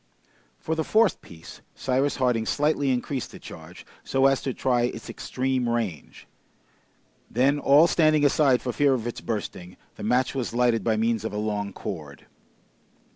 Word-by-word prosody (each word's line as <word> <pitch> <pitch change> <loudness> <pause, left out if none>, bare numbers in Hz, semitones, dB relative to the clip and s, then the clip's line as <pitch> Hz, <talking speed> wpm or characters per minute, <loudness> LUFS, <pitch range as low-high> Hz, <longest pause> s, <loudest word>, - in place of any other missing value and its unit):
For 160 - -3
the 160 0 -1
fourth 220 +5 +2
piece 80 -1 -13
Cyrus 135 +2 0
Harding 125 -4 0
slightly 145 -1 +1
increased 130 +1 -2
the - - -11
charge, - - -12 0.2
so 135 0 +1
as 135 -1 +3
to 135 - -2
try 125 -1 +1
its 125 - -5
extreme 130 -1 -2
range. 110 -10 -4 1.0
Then, 135 +5 +2
all 145 +3 +6
standing 155 -3 +3
aside 140 -3 +3
for 125 - -2
fear 140 -2 +3
of 115 -3 -4
its 120 - -5
bursting, 90 -4 -5 0.2
the - - -8
match 125 +4 +1
was 125 -4 -3
lighted 120 -2 +2
by 110 -2 +1
means 115 -1 0
of 110 - -4
a - - -3
long 105 -1 -2
cord. 75 -8 -8
125 Hz, 165 wpm, -25 LUFS, 110-140 Hz, 1.0 s, all